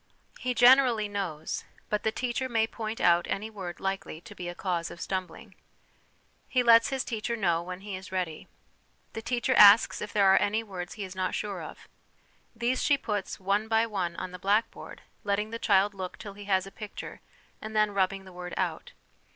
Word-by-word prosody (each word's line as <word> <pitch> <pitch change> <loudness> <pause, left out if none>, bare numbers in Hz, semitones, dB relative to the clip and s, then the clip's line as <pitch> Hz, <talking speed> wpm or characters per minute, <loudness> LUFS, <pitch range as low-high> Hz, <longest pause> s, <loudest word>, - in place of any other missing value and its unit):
He 250 -1 -2
generally 245 -3 +6
knows, 185 -7 -4 0.2
but 210 - -1
the 220 - 0
teacher 255 +2 -2
may 225 -2 +2
point 225 0 -5
out 175 0 +4
any 215 +3 -3
word 185 -5 -7
likely 195 -4 -3
to - - -12
be 175 -1 -6
a 175 - -7
cause 175 -3 -2
of 170 - -10
stumbling. 185 +3 -5 1.0
He 255 -2 +2
lets 230 -1 +6
his 265 -1 -1
teacher 235 0 -3
know 175 -6 +1
when 180 +1 -7
he 200 -1 -6
is 185 0 -9
ready. 180 -4 -3 0.7
The 225 - -5
teacher 240 +1 0
asks 205 +2 +7
if 210 - -5
there 205 -2 +3
are - - +5
any 215 +2 +1
words 180 -4 -7
he 210 - -5
is 185 -1 -8
not 185 0 -1
sure 200 -4 -4
of. 155 - -10 0.7
These 240 +3 0
she 285 - +3
puts, 205 -6 -3
one 200 +3 0
by 225 0 +3
one, 185 -6 -3
on 185 - -5
the 180 - -9
blackboard, 205 +5 -1 0.2
letting 210 +1 -1
the 230 - -4
child 200 -1 +3
look 185 -2 -6
till 200 -2 -8
he 205 0 -10
has 190 -2 +1
a 195 - -10
picture, 210 0 -8 0.4
and 215 0 -7
then 215 -1 +3
rubbing 195 0 0
the 185 - -13
word 180 0 -7
out. - - -3
200 Hz, 200 wpm, -28 LUFS, 185-225 Hz, 1.0 s, asks